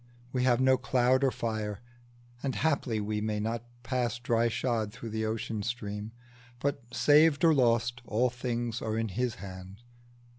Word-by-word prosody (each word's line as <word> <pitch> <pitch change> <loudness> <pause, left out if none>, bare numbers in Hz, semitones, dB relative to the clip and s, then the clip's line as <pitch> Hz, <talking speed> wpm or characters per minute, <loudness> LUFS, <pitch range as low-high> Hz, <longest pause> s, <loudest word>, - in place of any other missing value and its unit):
We 125 -1 +1
have 120 -2 +4
no 130 0 +5
cloud 130 +1 +2
or 135 - +5
fire, 110 -4 -3 0.6
and 135 -2 -2
haply 140 -7 +1
we 105 0 -2
May 105 -1 -1
not 115 +2 -2 0.2
pass 125 -3 -1
dry 120 -1 +1
shod 115 -3 -1
through 115 -1 -8
the 110 0 -1
ocean 110 -1 -3
stream; 105 -2 -4 0.5
But, 140 +1 -1
saved 150 +3 +5
or 165 - +6
lost, 120 -2 +2
all 120 +3 +2
things 120 -2 -3
are 110 0 -2
in 115 -1 -1
His 120 +4 -1
hand." 95 0 -10
120 Hz, 160 wpm, -30 LUFS, 110-125 Hz, 0.6 s, or